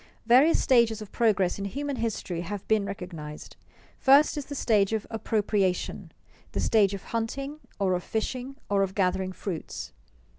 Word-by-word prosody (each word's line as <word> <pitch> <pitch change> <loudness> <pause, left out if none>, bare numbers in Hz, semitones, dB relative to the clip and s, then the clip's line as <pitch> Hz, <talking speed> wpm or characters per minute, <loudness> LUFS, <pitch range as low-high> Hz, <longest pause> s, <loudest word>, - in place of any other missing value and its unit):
_ - - -24 0.2
Various 260 +8 +6
stages 235 -4 +3
of 205 - -14
progress 200 -5 +2
in 200 - -3
human 280 +6 -3
history 215 -7 -3
have 195 +3 -6
been 215 -2 +2
recognized. 170 -6 -7 0.4
First 280 +3 +5
is 295 -2 -4
the 285 - -6
stage 215 -5 +2
of 220 -2 -1
appropriation 210 -4 -1 0.4
the - - -2
stage 205 -3 +3
of 195 - -9
hunting, 275 +6 -3 0.2
or 195 -3 +1
of 180 0 -1
fishing, 255 +4 -3
or 200 -1 +2
of 190 -1 -1
gathering 185 -1 +1
fruits. 185 -3 -6
210 Hz, 160 wpm, -27 LUFS, 190-235 Hz, 0.4 s, Various